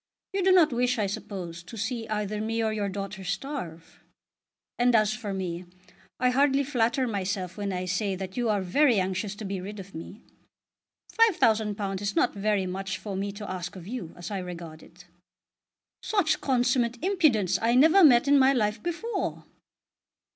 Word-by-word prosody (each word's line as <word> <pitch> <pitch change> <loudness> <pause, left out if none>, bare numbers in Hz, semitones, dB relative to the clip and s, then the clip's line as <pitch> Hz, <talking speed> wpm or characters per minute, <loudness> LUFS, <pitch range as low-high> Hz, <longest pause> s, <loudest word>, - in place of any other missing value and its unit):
You 390 -1 0
do 380 - +5
not 345 -7 +5
wish, 250 +1 +1
I 210 - +1
suppose, 185 -4 -5
to 180 +6 -11
see 225 +1 -3
either 210 0 -2
me 225 +1 -1
or 220 -1 0
your 205 -2 -1
daughter 195 0 -6
starve. 190 - -5 0.8
And 245 0 +4
as 215 -1 +3
for 215 -3 -5
me, 180 -2 -4 0.5
I 250 0 +3
hardly 275 +1 +3
flatter 255 -1 +1
myself 190 -4 -3
when 200 -1 -3
I 180 0 -3
say 190 +2 -1
that 190 0 -6
you 240 -2 0
are 205 -2 +1
very 240 +4 +3
anxious 190 +2 -2
to 215 - -7
be 195 -1 -3
rid 205 +2 -7
of 195 0 -10
me. 190 +7 -9 1.0
£5000 215 - +2
is 200 0 -2
not - - +2
very 205 -1 0
much 190 +1 -4
for 195 +1 -6
me 200 +1 -2
to 205 0 -8
ask 180 -1 -5
of 180 -3 -9
you, 225 -8 -5
as 175 +4 -7
I 200 - -2
regard 170 -3 -8
it." 175 +1 -17 1.0
"Such 395 -7 +1
consummate 245 -2 +1
impudence 305 - +2
I 230 +2 +2
never 320 +9 +6
met 255 -3 +6
in 285 0 +6
my 265 +1 +5
life 210 -3 0
before!" 385 +5 -3
210 Hz, 175 wpm, -27 LUFS, 190-250 Hz, 1.0 s, never